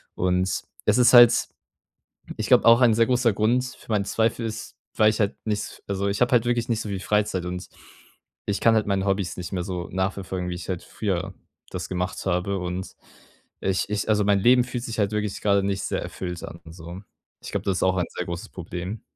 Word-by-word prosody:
Und 90 Hz, 0 st, 0 dB, 0.2 s
es -, -, +3 dB
ist 125 Hz, 0 st, +5 dB
halt 120 Hz, -1 st, +7 dB, 0.9 s
ich -, -, -3 dB
glaube, -, -, +5 dB
auch 115 Hz, +2 st, +8 dB
ein 120 Hz, -2 st, +6 dB
sehr 115 Hz, +1 st, +3 dB
großer 125 Hz, -3 st, +2 dB
Grund 120 Hz, +5 st, +2 dB
für 130 Hz, -2 st, -12 dB
meinen 100 Hz, -2 st, +1 dB
Zweifel 115 Hz, +1 st, 0 dB
ist, 110 Hz, 0 st, -7 dB, 0.2 s
weil 110 Hz, -1 st, +5 dB
ich 110 Hz, -, -3 dB
halt 100 Hz, +1 st, +1 dB
nichts 105 Hz, -1 st, -3 dB
also 100 Hz, 0 st, -1 dB
ich 100 Hz, +3 st, -2 dB
habe 125 Hz, +1 st, +2 dB
halt 120 Hz, -2 st, +4 dB
wirklich 120 Hz, 0 st, 0 dB
nicht 115 Hz, -1 st, 0 dB
so 105 Hz, -, -6 dB
viel 95 Hz, -, -3 dB
Freizeit 100 Hz, -3 st, 0 dB
und 90 Hz, 0 st, -5 dB, 0.8 s
ich 100 Hz, -, -1 dB
kann 115 Hz, -1 st, +5 dB
halt 110 Hz, -, +1 dB
meine 100 Hz, -1 st, 0 dB
Hobbys 95 Hz, -2 st, -1 dB
nicht 90 Hz, +1 st, -6 dB
mehr 90 Hz, -2 st, -2 dB
so 90 Hz, -2 st, -4 dB
nachverfolgen, 95 Hz, -1 st, -2 dB
wie 90 Hz, -, -3 dB
ich 90 Hz, +1 st, -8 dB
halt 90 Hz, -2 st, -3 dB
früher 95 Hz, -2 st, -3 dB, 0.4 s
das -, -, -5 dB
gemacht 90 Hz, 0 st, -3 dB
habe. 95 Hz, +2 st, 0 dB
Und, 90 Hz, +1 st, -5 dB, 0.7 s
äh, 95 Hz, -, 0 dB
ich 95 Hz, -, -1 dB
ich 105 Hz, 0 st, -2 dB
also 105 Hz, -1 st, +3 dB
mein 100 Hz, -1 st, +3 dB
Leben 125 Hz, +3 st, +5 dB
fühlt 125 Hz, 0 st, -5 dB
sich 115 Hz, -3 st, -5 dB
halt 100 Hz, -, +1 dB
wirklich 105 Hz, -1 st, -2 dB
gerade 100 Hz, -1 st, +3 dB
nicht 100 Hz, -1 st, -1 dB
sehr -, -, -2 dB
erfüllt 90 Hz, -2 st, -6 dB
an 85 Hz, -, -9 dB
und 80 Hz, 0 st, -12 dB
so. 85 Hz, +2 st, -9 dB, 0.4 s
Ich -, -, -7 dB
glaube, -, -, -2 dB
das 95 Hz, -2 st, +1 dB
ist -, -, -4 dB
auch 95 Hz, 0 st, +2 dB
ein 90 Hz, -, +1 dB
sehr 90 Hz, -, -3 dB
großes 85 Hz, 0 st, -6 dB
Problem. 90 Hz, +4 st, -6 dB
100 Hz, 225 wpm, -24 LUFS, 90-110 Hz, 0.9 s, auch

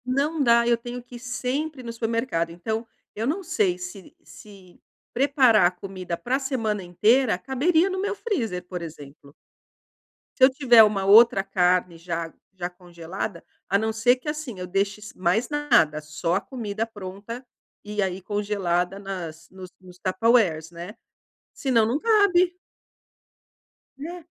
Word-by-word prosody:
Não 285 Hz, +5 st, 0 dB
dá, 235 Hz, -2 st, +4 dB
eu 240 Hz, -1 st, +3 dB
tenho 240 Hz, +1 st, -7 dB
que 245 Hz, -, -13 dB
ir -, -, -8 dB
sempre 255 Hz, +4 st, -3 dB
no 230 Hz, -1 st, -6 dB
supermercado, 230 Hz, -7 st, -1 dB
então, 220 Hz, +7 st, -4 dB, 0.3 s
eu 225 Hz, +3 st, -2 dB
não 350 Hz, +8 st, -1 dB
sei 190 Hz, -, 0 dB
se 180 Hz, +1 st, -9 dB
se 195 Hz, -4 st, -16 dB, 0.3 s
preparar 260 Hz, -, +4 dB
a -, -, -1 dB
comida 185 Hz, -1 st, -6 dB
para 255 Hz, +6 st, -1 dB
semana 225 Hz, -7 st, -2 dB
inteira 210 Hz, +6 st, +2 dB
caberia 315 Hz, -, +1 dB
no 375 Hz, 0 st, -3 dB
meu 410 Hz, +1 st, -2 dB
freezer, 225 Hz, -, -3 dB
por 180 Hz, -1 st, -6 dB
exemplo. 145 Hz, -3 st, -11 dB, 1.0 s
Se 260 Hz, -, +2 dB
eu 260 Hz, -, +9 dB
tiver 260 Hz, -4 st, +6 dB
uma 205 Hz, -2 st, +1 dB
outra 210 Hz, 0 st, +7 dB
carne 180 Hz, -2 st, +1 dB
já 165 Hz, -1 st, -5 dB, 0.2 s
já 180 Hz, -2 st, -4 dB
congelada, 175 Hz, 0 st, -7 dB, 0.2 s
a 195 Hz, -, 0 dB
não 220 Hz, +2 st, -1 dB
ser 235 Hz, +3 st, +3 dB
que, 255 Hz, +4 st, -6 dB
assim, 300 Hz, -9 st, -5 dB
eu 180 Hz, -, -5 dB
deixe 195 Hz, +3 st, -1 dB
s 210 Hz, -, -11 dB
mais 185 Hz, +6 st, +1 dB
nada, 240 Hz, -, +2 dB
só 155 Hz, +3 st, -2 dB
a 195 Hz, -, 0 dB
comida 220 Hz, -1 st, -4 dB
pronta, 205 Hz, +3 st, -8 dB, 0.4 s
e 210 Hz, 0 st, -3 dB
aí 190 Hz, 0 st, -3 dB
congelada 195 Hz, -2 st, -1 dB
nas 170 Hz, -5 st, -7 dB
nos 185 Hz, -1 st, -11 dB
nos 180 Hz, -1 st, -15 dB
Tupperwares, 185 Hz, -5 st, +2 dB
né, 175 Hz, +4 st, -9 dB, 0.6 s
senão, 250 Hz, -5 st, +2 dB
não 240 Hz, +6 st, 0 dB
cabe. 375 Hz, -5 st, +3 dB, 1.4 s
É. 340 Hz, +4 st, -7 dB
210 Hz, 155 wpm, -24 LUFS, 180-255 Hz, 1.4 s, eu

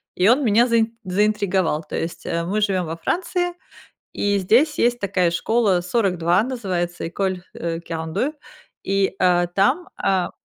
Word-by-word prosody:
и 180 Hz, -, +3 dB
он 255 Hz, +6 st, +4 dB
меня 230 Hz, +1 st, +4 dB
заи 230 Hz, -1 st, +2 dB
заинтриговал. 190 Hz, -4 st, 0 dB
То -, -, -6 dB
есть, 165 Hz, +1 st, -4 dB
э, 170 Hz, 0 st, -1 dB
мы 205 Hz, +5 st, -1 dB
живем 190 Hz, -4 st, +1 dB
во 165 Hz, +1 st, -5 dB
Франции, 355 Hz, -, -1 dB, 0.6 s
и 205 Hz, 0 st, 0 dB
здесь 245 Hz, -, +3 dB
есть 240 Hz, 0 st, +2 dB
такая 185 Hz, -4 st, +1 dB
школа 195 Hz, 0 st, +1 dB
"42", 180 Hz, -3 st, +1 dB
называется 190 Hz, -9 st, -3 dB
école, 185 Hz, +1 st, -2 dB
э, 165 Hz, 0 st, -3 dB
quarante-deux, 165 Hz, -, -3 dB, 0.5 s
и, 195 Hz, 0 st, 0 dB
а, 175 Hz, -1 st, +3 dB
там, 250 Hz, -, +1 dB
а 190 Hz, -2 st, 0 dB
195 Hz, 150 wpm, -22 LUFS, 175-230 Hz, 0.6 s, он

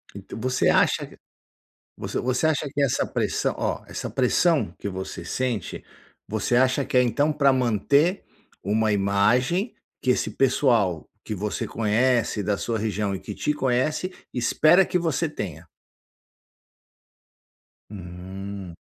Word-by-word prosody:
Então, 100 Hz, +2 st, -8 dB
você 130 Hz, +1 st, +1 dB
acha -, -, +2 dB, 0.9 s
você -, -, -3 dB
você 130 Hz, +5 st, +1 dB
acha 150 Hz, -2 st, 0 dB
que 145 Hz, -, 0 dB
essa 135 Hz, -3 st, +1 dB
pressão -, -, -1 dB
ó, -, -, -2 dB
essa -, -, -5 dB
pressão 135 Hz, -, +2 dB
que -, -, -5 dB
você 95 Hz, -3 st, -6 dB
sente, 120 Hz, 0 st, -3 dB, 0.4 s
você 110 Hz, +3 st, -1 dB
acha 130 Hz, +2 st, +3 dB
que -, -, -5 dB
é 125 Hz, -, +7 dB
então 145 Hz, +6 st, +1 dB
pra 140 Hz, -2 st, +4 dB
manter 130 Hz, -, +2 dB, 0.4 s
uma 110 Hz, +2 st, +1 dB
imagem, 115 Hz, -, +2 dB, 0.3 s
que 130 Hz, -, +2 dB
esse -, -, 0 dB
pessoal 120 Hz, -, +1 dB
que 110 Hz, -, -5 dB
você 105 Hz, +2 st, -3 dB
conhece, 115 Hz, +1 st, +1 dB
da 100 Hz, +1 st, 0 dB
sua 115 Hz, -1 st, -2 dB
região 105 Hz, -2 st, -1 dB
e -, -, -6 dB
que 105 Hz, -, -7 dB
te 150 Hz, -, 0 dB
conhece, 150 Hz, +6 st, 0 dB, 0.2 s
espera 155 Hz, +9 st, +4 dB
que 180 Hz, -, 0 dB
você 165 Hz, -1 st, 0 dB
tenha? 85 Hz, -, -6 dB, 2.2 s
Hum. 95 Hz, 0 st, -8 dB
120 Hz, 135 wpm, -24 LUFS, 100-140 Hz, 2.2 s, é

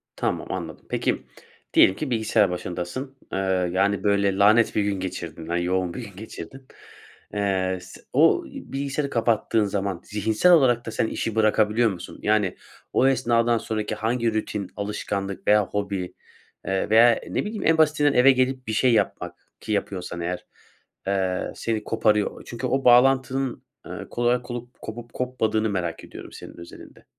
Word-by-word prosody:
Tamam, -, -, -2 dB
anladım. -, -, -6 dB
Peki, -, -, -1 dB, 0.5 s
diyelim 95 Hz, -, +6 dB
ki 145 Hz, +5 st, -4 dB
bilgisayar 110 Hz, -3 st, +2 dB
başındasın, 90 Hz, +10 st, -5 dB, 0.2 s
eee, -, -, 0 dB, 0.3 s
yani 100 Hz, +2 st, +1 dB
böyle 100 Hz, -1 st, +2 dB
lanet 110 Hz, +3 st, +4 dB
bir 105 Hz, -, +2 dB
gün 100 Hz, -2 st, -1 dB
geçirdin, 85 Hz, -3 st, -6 dB
na 85 Hz, +1 st, -1 dB
yoğun 90 Hz, 0 st, 0 dB
bir 125 Hz, -, -6 dB
gün 100 Hz, -4 st, -11 dB
geçirdin. 110 Hz, +5 st, -10 dB, 0.7 s
Eee, 95 Hz, -2 st, 0 dB
s 90 Hz, -, -13 dB
o, -, -, +4 dB
bilgisayarı 140 Hz, +1 st, -4 dB
kapattığın 115 Hz, -2 st, +1 dB
zaman 100 Hz, -3 st, -2 dB
zihinsel 110 Hz, -, +2 dB
olarak 125 Hz, -8 st, +4 dB
da 115 Hz, -, -5 dB
sen 110 Hz, -, 0 dB
işi 115 Hz, 0 st, -3 dB
bırakabiliyor 110 Hz, +1 st, +3 dB
musun? 90 Hz, -2 st, -9 dB
Yani 105 Hz, -3 st, +1 dB, 0.4 s
o 130 Hz, -, +4 dB
esnadan 120 Hz, -2 st, +2 dB
sonraki 110 Hz, -1 st, -3 dB
hangi 115 Hz, 0 st, 0 dB
rutin 105 Hz, -2 st, -3 dB
alışkanlık 100 Hz, -1 st, -4 dB
veya 105 Hz, -1 st, +5 dB
hobi 100 Hz, -3 st, -3 dB, 0.5 s
veya, 110 Hz, +5 st, +4 dB
eee, -, -, -11 dB
ne -, -, 0 dB
bileyim, 210 Hz, -1 st, -4 dB
en 165 Hz, 0 st, +4 dB
basitinden 150 Hz, -2 st, +3 dB
eve 135 Hz, +1 st, +6 dB
gelip 130 Hz, -1 st, 0 dB
bir 110 Hz, -, -2 dB
şey 120 Hz, +2 st, +3 dB
yapmak 110 Hz, -, 0 dB, 0.2 s
ki 110 Hz, -, -6 dB
yapıyorsan 90 Hz, -4 st, -3 dB
eğer, 90 Hz, +1 st, -4 dB, 0.6 s
eee, 95 Hz, -2 st, -1 dB
seni 110 Hz, -2 st, -2 dB
koparıyor. 105 Hz, -2 st, +1 dB
O -, -, -13 dB
çünkü 120 Hz, +2 st, -5 dB
o 135 Hz, +1 st, -1 dB
bağlantının, 130 Hz, +1 st, +3 dB, 0.2 s
eee, -, -, -9 dB, 0.2 s
kolay 120 Hz, +1 st, +1 dB
kolup 120 Hz, 0 st, -8 dB
kopup 115 Hz, +1 st, -8 dB
kopmadığını 110 Hz, -4 st, 0 dB
merak 85 Hz, -4 st, -3 dB
ediyorum -, -, -11 dB
senin -, -, -11 dB
özelinde. 85 Hz, 0 st, -13 dB
110 Hz, 155 wpm, -24 LUFS, 95-125 Hz, 0.7 s, diyelim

